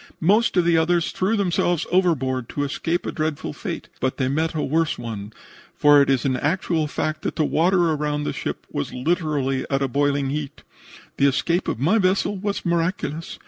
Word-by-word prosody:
Most 205 +5 +3
of 175 - +4
the 170 -1 +4
others 170 0 +1
threw 200 +4 0
themselves 175 -3 +1
overboard 135 -9 +1
to 145 - -2
escape 165 +5 -2
a - - -2
dreadful 155 - -3
fate, - - -6
but 130 0 -1
they 130 - 0
met 160 +4 -1
a 155 - -1
worse 160 +2 0
one, 110 -3 -6 0.4
for 145 -1 +6
it 140 - +2
is 135 -1 +1
an 130 -1 +1
actual 160 +1 0
fact 155 +1 -3
that - - -3
the 155 - +1
water 175 +2 +2
around 150 -1 -1
the - - -2
ship - - -5
was 70 - -3
literally 140 -2 -1
at 135 0 +1
a - - +1
boiling 140 0 0
heat. 145 -1 -5 0.5
The 140 - +4
escape 170 +6 0
of - - -1
my 175 - +3
vessel 195 +1 +1
was 200 +1 -3
miraculous. 170 -1 -2
155 Hz, 190 wpm, -23 LUFS, 140-175 Hz, 0.5 s, for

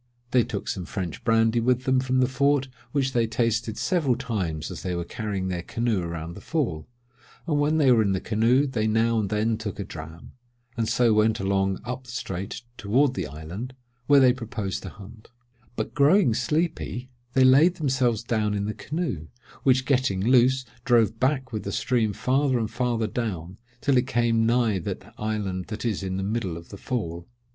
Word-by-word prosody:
They 125 -2 +4
took 100 -3 -5
some 90 - -3
French 90 -4 -5
brandy 115 0 +3
with 125 +2 +1
them 130 -1 +2
from 130 0 +1
the 125 - +4
fort, 140 +1 +2 0.2
which 135 -2 0
they 115 -2 +2
tasted 115 -1 0
several 160 -9 +1
times 95 - -3
as - - -7
they 90 -2 -2
were 85 - -2
carrying 100 0 -3
their 90 -2 -2
canoe 115 +1 -1
around 85 -1 -5
the - - -10
Fall; 115 - -2 0.6
and 150 -3 +1
when 150 +2 +2
they 140 -4 +5
were 115 -2 +5
in 100 -3 +1
the 95 - 0
canoe, 115 +7 +2
they 115 -6 -1
now 115 +1 +2
and 100 -3 -1
then 110 +2 0
took 105 -3 -5
a - - -1
dram, 80 -1 -10 0.4
and 115 -1 -1
so 120 -1 +3
went 110 +1 +3
along 95 0 0
up 125 +1 -5
the - - -14
strait 100 -2 -5 0.2
toward 125 +6 +2
the 95 -8 -3
island 85 - -7 0.3
where 145 -1 +7
they 130 -2 +6
proposed 110 -6 -4
to - - -7
hunt; 105 +2 -13 0.5
but 110 - -3
growing 150 - +4
sleepy, 150 -3 -2 0.2
they 130 - +5
laid 145 +8 +6
themselves 130 -7 +1
down 110 -3 0
in 100 0 -1
the 105 - -2
canoe, 150 - -4 0.3
which 130 -1 +3
getting 130 -8 +1
loose, 130 +3 +4 0.2
drove 115 -3 +3
back 130 -2 0
with 110 - -2
the - - -5
stream 115 -4 +1
farther 130 +4 +1
and 110 -2 -2
farther 120 -3 0
down, 100 -6 -4 0.2
till 140 - +2
it 125 +1 +2
came 115 -2 +2
nigh 115 -4 +2
that - - -6
island 105 -4 -2
that 110 +2 -5
is 110 -5 -1
in 95 -1 -3
the 95 - -2
middle 100 -4 -2
of 85 - -12
the 100 - -9
Fall. 85 -8 -4
115 Hz, 195 wpm, -25 LUFS, 100-130 Hz, 0.6 s, where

